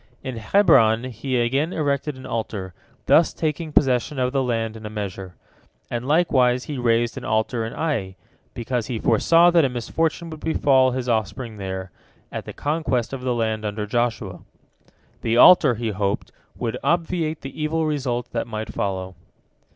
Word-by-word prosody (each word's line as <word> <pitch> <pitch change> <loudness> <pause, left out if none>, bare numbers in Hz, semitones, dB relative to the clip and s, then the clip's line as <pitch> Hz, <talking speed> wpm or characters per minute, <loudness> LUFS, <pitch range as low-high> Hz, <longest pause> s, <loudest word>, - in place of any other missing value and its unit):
In 130 -3 -5
Hebron 115 - +4
he 125 +3 -2
again 135 +8 +1
erected 145 -2 -1
an 130 - -10
altar, 105 -6 -4 0.3
thus 165 - +4
taking 155 0 -3
possession 135 0 +2
of 130 0 0
the 135 - +2
land 115 -3 -1
in 110 - -10
a 105 - -5
measure. 100 -3 -6 0.6
And 120 +1 -3
likewise 130 -6 +3
he 145 -4 -5
raised 120 -1 +1
an - - -13
altar 110 +2 0
in 110 - -5
Ai, 110 -13 -2 0.4
because 120 -1 -2
he 120 - -3
foresaw 165 +11 +4
that 170 -2 +5
a 135 - +2
misfortune 160 +7 -2
would 155 - -8
befall 135 -5 +3
his 125 0 -3
offspring 110 0 -2
there, 95 -2 -5 0.4
at - - -5
the - - -7
conquest 145 -6 -1
of 135 - -4
the 125 -1 -1
land 110 -2 -1
under 105 0 -3
Joshua. 120 +2 -2 0.8
The 115 0 0
altar, 130 -3 +7
he 115 0 -3
hoped, 100 0 -2 0.3
would 120 0 -3
obviate 165 -2 0
the 135 +3 -8
evil 160 +1 0
results 130 -5 -2
that - - -3
might 110 -1 -5
follow. 95 -2 -3
125 Hz, 165 wpm, -23 LUFS, 110-145 Hz, 0.8 s, altar